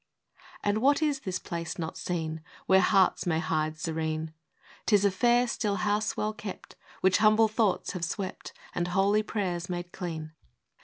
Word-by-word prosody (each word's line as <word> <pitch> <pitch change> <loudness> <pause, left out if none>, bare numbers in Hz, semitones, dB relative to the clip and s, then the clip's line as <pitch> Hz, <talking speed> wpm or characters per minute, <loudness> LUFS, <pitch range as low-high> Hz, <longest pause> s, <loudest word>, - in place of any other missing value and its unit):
v. - - -36 0.2
And 205 +1 +2
what 280 +5 +3
is 290 -3 +1
this 185 -7 -3
place 170 -2 -5
not 160 -1 -4
seen, 160 -3 -3 0.2
Where 190 0 +5
Hearts 190 -2 +3
may 160 -2 +2
hide 155 -1 -1
serene? 160 -1 -2 0.2
— - - -37
" - - -24
'T 215 - +5
is 205 0 +3
a 200 - +4
fair 240 +5 +3
still 210 -3 -1
house 205 +3 0
well 215 0 -1
kept, 210 -3 -8 0.3
Which 190 +1 +4
humble 215 +1 +5
thoughts 215 -2 0
have 180 -3 -5
swept, 185 +2 -4 0.2
And 175 - -1
holy 195 +4 +3
prayers 185 -5 -3
made 175 0 -4
clean. 160 -4 -5
185 Hz, 185 wpm, -28 LUFS, 170-215 Hz, 0.3 s, Where